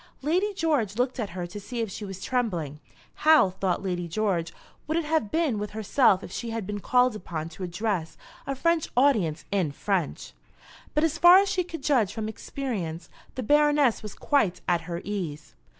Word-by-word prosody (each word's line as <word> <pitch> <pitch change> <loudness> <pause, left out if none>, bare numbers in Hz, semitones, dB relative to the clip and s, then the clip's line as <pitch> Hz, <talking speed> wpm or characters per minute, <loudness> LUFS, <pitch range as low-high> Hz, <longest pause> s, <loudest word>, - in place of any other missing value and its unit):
Lady 365 +8 +1
George 290 - 0
looked 250 +2 -1
at 215 -4 -2
her 175 0 -5
to 175 +4 -8
see 240 +4 -6
if 225 -3 -2
she 210 - -6
was 195 -2 -7
trembling. 175 - -2 0.4
How, 310 -11 +6
thought 190 -1 -1
Lady 175 -2 -2
George, 170 -2 -1 0.4
would 315 +2 0
it 335 - -1
have 305 -8 0
been 310 -8 0
with 210 0 -3
herself 215 -2 +3
if - - -9
she 235 - -4
had 225 -3 -3
been 205 +1 -4
called 250 +2 +3
upon 165 -5 -5
to 165 - -13
address 180 -2 -2 0.3
a 275 - -1
French 335 +3 +1
audience 215 - +2
in 185 -7 +1
French! 185 +1 -2 0.6
But 300 - +3
as 325 0 0
far 350 +2 +9
as 395 +1 +3
she 365 - 0
could 330 -4 -8
judge 230 -9 +2
from 220 -2 -3
experience, 200 -9 -5 0.3
the 255 - -3
Baroness 295 -1 +3
was 210 -2 -8
quite 225 - +1
at 175 -1 0
her 170 0 -3
ease. 170 -7 -5
215 Hz, 190 wpm, -26 LUFS, 180-285 Hz, 0.6 s, far